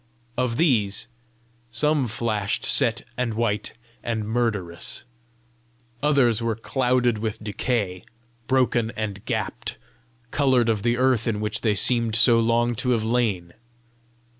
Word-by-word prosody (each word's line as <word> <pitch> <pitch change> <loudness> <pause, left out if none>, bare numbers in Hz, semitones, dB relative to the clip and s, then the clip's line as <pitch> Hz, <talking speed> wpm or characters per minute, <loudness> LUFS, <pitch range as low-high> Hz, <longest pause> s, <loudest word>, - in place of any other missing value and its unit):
Of 125 -2 -1
these, 110 - +1 0.6
some 145 +3 +2
flashed 110 -2 -1
set - - +3
and 120 -3 -1
white 110 -2 -1 0.3
and 110 -3 -3
murderous; 105 -7 -2 1.0
others 135 -6 +3
were 115 -1 0
clouded 125 0 +1
with 110 0 -4
decay, 105 -3 -2 0.4
broken 125 -3 +2
and 105 -2 -4
gapped, - - -3 0.5
coloured 130 -5 +2
of 110 -3 +1
the 120 +2 +1
earth 125 -3 +2
in 110 -2 0
which 105 0 -3
they 110 -3 +1
seemed 115 +1 +2
so 115 0 +5
long 120 +1 +2
to 125 +1 -1
have 110 - -3
lain! 110 -7 0
115 Hz, 125 wpm, -24 LUFS, 105-125 Hz, 1.0 s, so